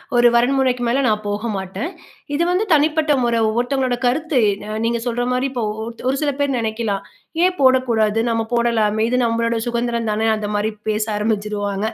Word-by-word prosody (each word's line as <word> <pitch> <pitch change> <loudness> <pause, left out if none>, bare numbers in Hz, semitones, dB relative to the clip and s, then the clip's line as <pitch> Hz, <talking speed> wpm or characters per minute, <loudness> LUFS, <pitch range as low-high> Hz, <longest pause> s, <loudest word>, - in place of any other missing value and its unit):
ஒரு 240 0 +6
வரைமுறைக்கு 250 0 +2
மேல 255 +4 +1
நான் 215 -1 0
போக 205 +3 -2
மாட்டேன். 190 - -4 0.4
இது 315 +4 +1
வந்து 370 +4 +1
தனிப்பட்ட 305 +1 +2
முறை, 235 -1 +1
ஒவ்வொருத்தவங்களோட 245 +3 0
கருத்து. 295 +3 0 0.3
அ - - -7
நீங்க 235 0 0
சொல்ற 245 0 -1
மாரி 250 +1 0
இப்போ 245 -3 -3
ஓ 210 - -3
ஓருத் 230 +1 -8
ஒரு 270 - 0
சில 290 -1 +1
பேர் 285 -1 +1
நினைக்கலாம். 220 -3 -2 0.4
ஏன் 365 0 +3
போடக்கூடாது, 240 -5 +3
நம்ம 225 -1 0
போடலாமே 220 -2 +1
இது 250 - +1
நம்பளோட 230 0 0
சுகந்திரம் 235 -1 -1
தானே, 220 +1 0
அந்த 210 -1 -4
மாரி 210 +1 0 0.2
பேச 215 0 +1
ஆரம்பிச்சுருவாங்க. 210 -1 -2
235 Hz, 175 wpm, -20 LUFS, 215-260 Hz, 0.4 s, ஒரு